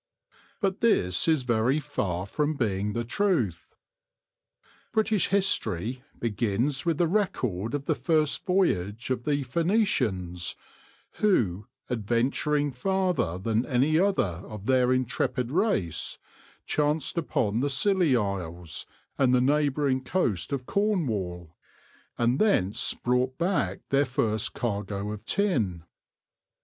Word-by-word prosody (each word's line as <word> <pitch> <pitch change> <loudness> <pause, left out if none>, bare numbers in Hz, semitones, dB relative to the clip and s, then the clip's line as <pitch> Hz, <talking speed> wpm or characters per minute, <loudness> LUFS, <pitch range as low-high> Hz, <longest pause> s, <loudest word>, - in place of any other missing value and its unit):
* - - -31
But 195 -1 0
this 90 - +3
is 155 -5 +3
very 120 +4 +2
far 100 - -2
from 150 +9 -1
being 105 -5 -1
the 120 - -1
truth. 120 - -1 1.2
British 220 -3 +2
history 125 - 0 0.2
begins 120 - -1
with 165 -3 +2
the 175 - +3
record 130 - -1
of 140 -1 -4
the - - +2
first 155 -3 +1
voyage 115 - 0
of 125 -2 -2
the 145 -2 +1
Phoenicians, 125 - 0 0.6
who, 110 - +1 0.2
adventuring 125 +6 0
farther 165 - 0
than 110 +4 0
any 135 +6 +2
other 140 - +1
of 105 -2 -8
their 130 0 +3
intrepid 130 0 0
race, 145 - 0 0.5
chanced 150 0 0
upon 115 -10 0
the 140 +3 +1
Scilly 175 0 +2
Isles 90 -5 -3 0.3
and 130 -2 +4
the - - +4
neighbouring 140 -1 +1
coast 120 - -1
of 135 -3 -2
Cornwall, 105 - -1 0.6
and 120 +2 +2
thence 105 - +2
brought 125 +1 0
back 170 - 0
their 140 +1 +3
first 110 -4 -1
cargo 105 -3 -3
of 105 0 -7
tin. 115 - 0
125 Hz, 120 wpm, -27 LUFS, 105-155 Hz, 1.2 s, and